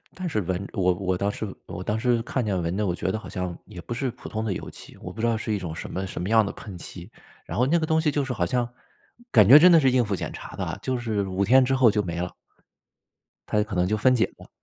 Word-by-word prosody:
但 185 -1 -4
是 110 -9 0
闻 95 +2 -3
我 90 -1 +2
我 95 0 -1
当 100 +2 0
时 110 - -4 0.2
我 90 - -6
当 105 +3 -1
时 120 -1 +1
看 125 +2 -2
见 100 -4 0
闻 85 +3 -2
的， 105 - 0
我 90 - 0
觉 95 - -2
得 - - -2
好 110 - -10
像 90 -3 -4
也 100 -4 -9
不 120 - -6
是 130 +2 -1
普 125 - -11
通 110 0 -3
的 110 - -1
油 - - -5
漆， - - -13
我 90 - -7
不 110 - -9
知 120 - +2
道 115 - +2
是 110 0 -3
一 105 - 0
种 85 -4 -5
什 - - -7
么 95 +1 -3
什 95 - -6
么 90 - -3
样 110 -1 +5
的 100 - -4
喷 100 -4 -10
漆， 90 +3 -10 0.3
然 - - -5
后 125 - +3
那 170 +5 +3
个 160 - -1
东 160 0 +2
西 155 -1 +2
就 145 -1 0
是 130 - -3
好 95 -7 0
像 120 +5 0 0.6
感 105 -2 +6
觉 140 - +11
真 180 +3 +7
的 165 - +7
是 135 -3 +4
应 125 -2 +3
付 105 - -2
检 - - -5
查 - - -9
的 - - -2
啊， - - -5
就 130 -1 -1
是 110 -4 -1
5 95 +1 -1
天 130 +6 +6
之 135 +1 +1
后 130 -4 +5
就 105 0 0
没 85 -2 -4
了。 90 - -3 1.2
它 105 - +2
可 105 -3 -5
能 90 - +2
就 110 - +1
分 130 +5 +4
解 115 -2 +3
了， - - -14
110 Hz, 320 characters per minute, -25 LUFS, 95-125 Hz, 1.2 s, 觉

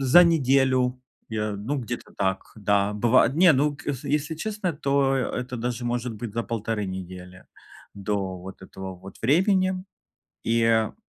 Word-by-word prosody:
за 135 +7 +7
неделю, 130 -5 +3 0.3
я, 105 -1 -1
ну, 110 +9 -3
где-то 120 -1 -6
так, 95 -1 -2
да. 100 -1 +1
Быва 110 +2 +4
не, 165 +7 +5
ну, 145 +2 +2
к - - -14 0.2
если 150 +2 0
честно, 195 0 -3
то, 140 -1 +2
а, - - +2 0.2
э, - - 0
это 125 0 -5
даже 120 +1 -3
может 120 0 -2
быть 110 0 -7
за 115 - 0
1,5 115 -2 -2
недели 90 -1 -8 0.5
до 100 -2 -2
вот 95 +2 -10
этого 95 0 -8
вот 95 +2 -12
времени. 185 - +3 0.6
И, 115 0 +2
а, 110 -1 +2
120 Hz, 160 wpm, -25 LUFS, 100-140 Hz, 0.6 s, за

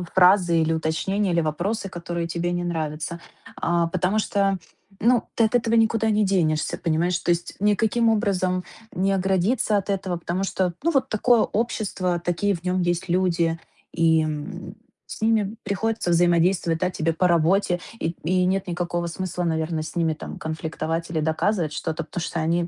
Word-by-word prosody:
фразы 180 -2 +5
или 160 0 +1
уточнения, 180 +5 0
или 170 - +3
вопросы, 185 +7 -2
которые 170 -1 -4
тебе 170 +1 -2
не 175 0 -2
нравятся, 160 -1 -3 0.4
а, 170 0 +1
потому 185 +4 0
что, 200 -2 +1 0.4
ну, 240 +2 +4
ты 230 - +3
от 220 - -2
этого 230 -1 +2
никуда 225 0 +3
не 210 0 +3
денешься, 165 -6 +1
понимаешь? 170 +2 0
То - - 0
есть 170 0 -2
никаким 215 +3 +2
образом 185 -4 +1 0.3
не 190 +2 +1
оградиться 195 +4 +1
от 200 0 -3
этого, 190 -2 -1
потому 175 +3 -2
что, 185 -2 -1
ну, 335 - +2
вот 270 -4 +1
такое 230 +2 +3
общество, 200 -6 -1
такие 175 +4 0
в 170 - -10
нём 180 0 0
есть 175 +1 -1
люди, 170 -2 +1 0.3
и, 165 -1 +3
м, 150 -1 -5 0.3
с - - -8
ними 220 -2 +2
приходится 205 -1 -1
взаимодействовать, 170 0 +3
да, 185 +1 0
тебе 165 -1 -1
по 180 +3 +2
работе. 175 +2 +2 0.2
И, - - -1
м, - - -5
и 180 +3 +2
нет 190 +1 0
никакого 175 -1 -2
смысла, 180 +1 -4
наверно, 160 -1 -1
с 155 - -7
ними 165 -2 +1
там 155 - -8
конфликтовать 160 +1 -3
или 160 -1 -1
доказывать 160 +1 0
что-то, 160 0 -3
потому 170 - -6
что 165 - -3
они 170 +2 +1
175 Hz, 175 wpm, -24 LUFS, 165-195 Hz, 0.4 s, фразы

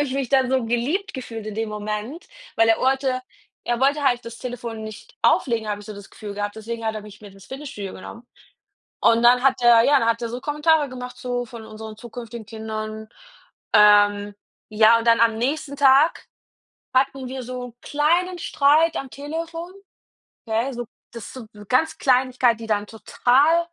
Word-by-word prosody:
habe 290 - +2
ich 260 - -5
mich 270 -3 -2
dann 265 -2 +2
so 260 -3 +1
geliebt 250 - -1
gefühlt 225 -4 -7
in 215 - -5
dem 225 0 -2
Moment. 210 +8 -5 0.3
Weil 225 0 +4
er 225 - +4
wollte 265 -1 +1 0.4
er 240 0 -1
wollte 285 +2 +2
halt 245 -3 +2
das 230 0 -9
Telefon 235 -3 -6
nicht 215 -1 -10
auflegen, 225 -4 +2
habe 205 0 -3
ich 205 - -13
so 215 - -7
das 200 -1 -12
Gefühl 205 -2 -8
gehabt. 205 0 -3
Deswegen 230 +1 -6
hat 220 - -1
er 215 - -5
mich 210 0 -13
mit 205 -2 -12
ins 195 0 -16
Fitnessstudio 265 -8 -7
genommen. 230 +5 -11 0.7
Und 230 0 +4
dann 245 +1 +5
hat 270 -2 +3
er 235 -1 +7
ja, 280 +2 +4
dann 230 - 0
hat 230 +1 0
er 235 - -2
so 245 +2 -6
Kommentare 300 +1 +2
gemacht 250 -1 -8
so 245 -1 -3
von 230 -1 -11
unseren 220 0 -9
zukünftigen 235 -1 -9
Kindern. 220 -1 -6 0.7
Ähm, 205 -1 +5 0.4
ja, 220 +2 +5
und 230 - -5
dann 230 0 +5
am 230 -1 +3
nächsten 285 +3 -2
Tag 280 +3 +4 0.7
hatten 265 0 +1
wir 260 0 -6
so 250 +1 -6
'n 235 - -17
kleinen 345 +5 +1
Streit 310 +3 +3
am 270 -2 -5
Telefon, 330 +6 -6 0.7
okay? 230 +5 -1
So, 240 0 -5 0.3
dass 235 -3 -9
so 255 -4 -9
b 210 - -15
ganz 285 +7 +2
Kleinigkeit, 255 -2 +2
die 225 - -7
dann 210 -1 -1
total 260 +8 +2
240 Hz, 190 wpm, -22 LUFS, 220-270 Hz, 0.7 s, er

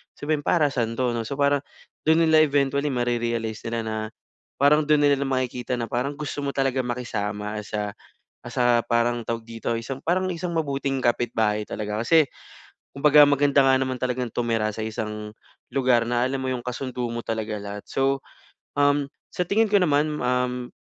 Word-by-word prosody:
sabihin, 145 0 -2
"Para 155 -4 +3
saan 115 -4 -1
'to?" 125 -2 +2
'no, 115 - -2
so 140 - -4
parang 140 0 +3 0.5
do'n 160 +1 +5
nila 160 0 +6
eventually 140 0 +1
mare-realize 120 -2 -1
nila 115 0 -2
na, 110 0 -3 0.6
parang 150 +2 +5
do'n 150 0 +3
nila 140 -1 +3
makikita 125 -1 -1
na 115 - -2
parang 130 +5 -1
gusto 145 -1 -4
mo 140 - -1
talagang 135 -1 +1
makisama 105 -3 -3
sa, 105 0 -3 0.5
ah, - - -8
sa 120 -1 +3
parang 120 +1 +2
tawag 115 -1 -2
dito, 115 0 -4
yung 115 - -4
isang 135 +2 -5
parang 185 +2 +1
isang 175 +1 -4
mabuting 140 -3 -1
kapitbahay 110 -3 +1
talaga. 105 0 -3
Kasi, 160 +4 +5 0.7
kumbaga 150 +1 +7
maganda 145 -1 +4
nga 135 0 +5
naman 130 -1 -1
talagang 125 -1 -1
tumira 115 -2 0
sa 110 - -3
isang 105 -1 -5 0.4
lugar 125 -3 +3
na 120 0 +1
alam 135 +1 -2
mo 130 - -2
'yong 125 -1 -4
kasundo 125 -1 -3
mo 120 0 -3
talaga 110 -1 -2
lahat. 100 0 -7
So, 135 0 +1 0.6
um, 145 0 +3 0.3
sa 180 - 0
tingin 220 +4 +2
ko 205 - +5
naman, 150 -2 +2
um, 125 0 0
125 Hz, 175 wpm, -24 LUFS, 115-145 Hz, 0.7 s, kumbaga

